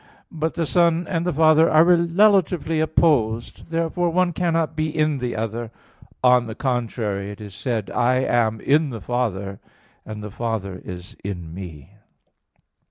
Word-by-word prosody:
But 160 0 -3
the 165 - 0
Son 170 +1 +2
and 170 -1 -1
the - - +2
Father 155 +1 +5
are 155 +1 +6
relatively 175 -1 +3
opposed. 130 -7 +1
Therefore 165 +1 0
one 175 +1 +1
cannot 165 -2 0
be 155 0 -1
in 155 -2 0
the 125 -1 -3
other. 115 +1 -3 0.5
On 125 -1 +5
the 110 - -6
contrary, 115 -6 -2
It 105 - -9
is 105 -2 -9
said 110 0 -2
(John - - -7
14:10): - - +2
"I 130 - +3
am 110 -2 +1
in 150 +2 +2
the 115 -5 -7
Father, 100 -5 -2 0.4
and 105 -1 -8
the 105 - -7
Father 105 -5 -4
is 90 0 -9
in 90 -5 -6
Me." 85 -4 -9
125 Hz, 165 wpm, -22 LUFS, 110-165 Hz, 0.5 s, are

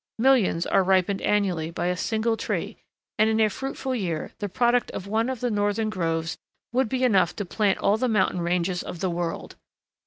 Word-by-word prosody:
Millions 230 -9 +3
are - - +3
ripened 190 +1 +2
annually 185 -6 0
by 170 - -3
a 180 0 +1
single 225 +5 0
tree, 220 - -3 0.4
and 215 +1 +5
in 220 0 +1
a 215 -1 +3
fruitful 270 +1 -4
year 175 -10 -3
the 205 - -3
product 240 +4 +2
of 185 - -5
one 220 +4 0
of 260 -3 -4
the 245 -1 0
northern 205 +1 0
groves 165 -4 -1 0.4
would 255 -2 +2
be 260 +2 -1
enough 190 -8 +3
to 205 - -4
plant 200 +1 +1
all 205 - +2
the 255 +2 0
mountain 190 -4 +1
ranges 175 +1 0
of 175 - -7
the 185 -1 -1
world. 170 0 -4
205 Hz, 195 wpm, -25 LUFS, 180-225 Hz, 0.4 s, and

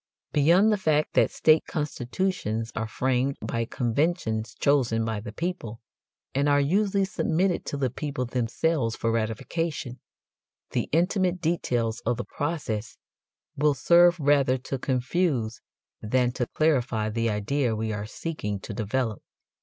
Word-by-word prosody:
Beyond 175 +9 +5
the 210 - +1
fact 155 -4 +1
that - - +4
state 155 0 +3
constitutions 130 - -2
are 110 +1 -2
framed 130 +3 0
by 115 0 -2
conventions 115 - -1
chosen 120 -6 +2
by 110 -2 -2
the 110 - -7
people, 160 -11 -4 0.5
and 140 +2 +2
are 145 0 +4
usually 195 +6 +2
submitted 180 -1 0
to 145 - -3
the 130 -3 0
people 145 -2 -3
themselves 120 +1 0
for 115 - -1
ratification, 125 +4 -2 0.7
the - - -1
intimate 180 +2 +1
details 120 -9 0
of 120 - 0
the 120 - -4
process 140 -8 -3 0.6
will 145 0 +2
serve 175 +5 +5
rather 140 -3 +3
to 130 +1 -5
confuse 130 -2 0 0.4
than 125 +3 +1
to 125 -1 -2
clarify 125 -8 +1
the 115 +1 0
idea 115 +4 0
we 110 0 -2
are 105 0 -4
seeking 105 -7 -4
to 110 - -7
develop. 110 +1 -2
130 Hz, 140 wpm, -26 LUFS, 115-160 Hz, 0.7 s, Beyond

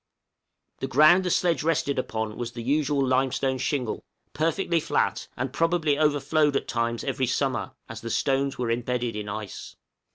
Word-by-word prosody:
The 135 - -2
ground 155 +7 +6
the - - +1
sledge 175 -1 +2
rested 150 -3 0
upon 110 -3 -3
was 120 0 -5
the 120 - -6
usual 140 +1 +1
limestone 130 0 +1
shingle, 130 -3 -2 0.3
perfectly 165 +2 +1
flat, - - 0
and 130 +1 -3
probably 165 -2 +1
overflowed 150 0 +2
at - - -1
times 115 -1 -1
every 130 -2 -1
summer, 130 -1 -1
as 115 -1 -8
the 115 - -5
stones 135 +3 0
were 120 -2 -1
embedded 120 -1 -1
in 105 -1 -4
ice. 105 -1 -7
135 Hz, 160 wpm, -26 LUFS, 120-150 Hz, 0.3 s, ground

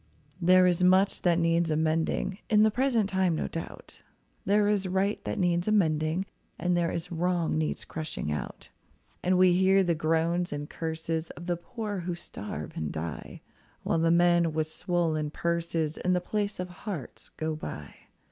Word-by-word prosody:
There 185 +1 +6
is 180 0 +2
much 190 +2 +4
that 175 -2 +3
needs 165 0 +2
amending 160 +5 0
In 210 -1 +5
the 220 - +4
present 240 -3 +1
time, 190 -3 +1
no - - -2
doubt; 165 - -8 0.5
There 205 +1 +3
is 205 -2 +1
right 190 +3 0
that - - -3
needs 175 0 +1
amending, 165 -3 +2 0.3
There 175 -1 +1
is 170 +2 -4
wrong 175 -1 0
needs 155 0 -2
crushing 155 - -4
out. 75 - -5 0.5
And 180 +1 +2
we 185 -1 +6
hear 190 +2 +4
the 175 -2 +2
groans 165 +2 0
and 145 0 -4
curses 160 0 -3
Of 175 - -10
the 175 -1 0
poor 210 +2 -5
who 175 0 -3
starve 105 - -7
and 80 -2 -3
die, 80 -4 -6 0.4
While 165 - +1
the 165 0 +3
men 170 -1 +4
with 155 0 0
swollen 160 -2 -1
purses 170 -1 -1
In 180 - +1
the 180 - +2
place 205 +2 -2
of 180 0 -3
hearts 175 - -7
go 155 0 -2
by. 75 - -7
175 Hz, 165 wpm, -28 LUFS, 160-185 Hz, 0.5 s, There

